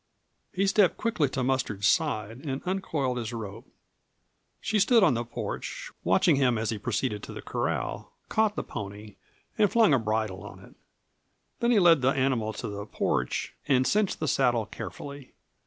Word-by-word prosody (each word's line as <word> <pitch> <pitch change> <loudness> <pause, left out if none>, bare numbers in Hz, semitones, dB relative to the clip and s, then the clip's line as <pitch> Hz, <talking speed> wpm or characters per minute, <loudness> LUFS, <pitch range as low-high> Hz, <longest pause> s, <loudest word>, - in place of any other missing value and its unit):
He 195 0 0
stepped 195 -1 +3
quickly 195 - 0
to 130 -1 -2
Mustard's 120 -6 0
side 120 - 0
and 135 -2 -4
uncoiled 150 -9 -1
his 115 0 -4
rope. 110 -2 -7 0.9
She 215 - 0
stood 225 +2 +5
on 165 - +5
the 120 0 -1
porch, 120 - -5
watching 95 - +4
him 125 -4 +3
as 110 +1 -1
he 110 - -3
proceeded 105 0 -2
to - - -8
the - - -7
corral, - - -3 0.2
caught 220 -1 +1
the - - -2
pony, 105 0 -8 0.4
and 210 -2 +4
flung 225 -9 +5
a 135 - +4
bridle 110 -3 -1
on 105 - -10
it. - - -16 0.9
Then 235 - +1
he 240 - +4
led 170 -6 +6
the 130 - +4
animal 130 -5 +1
to 110 +2 -6
the 100 0 -6
porch 60 -10 -1
and 130 -2 +3
cinched 210 +3 +1
the 155 - -1
saddle 120 -5 +2
carefully. 140 +4 -8
130 Hz, 170 wpm, -28 LUFS, 110-175 Hz, 0.9 s, led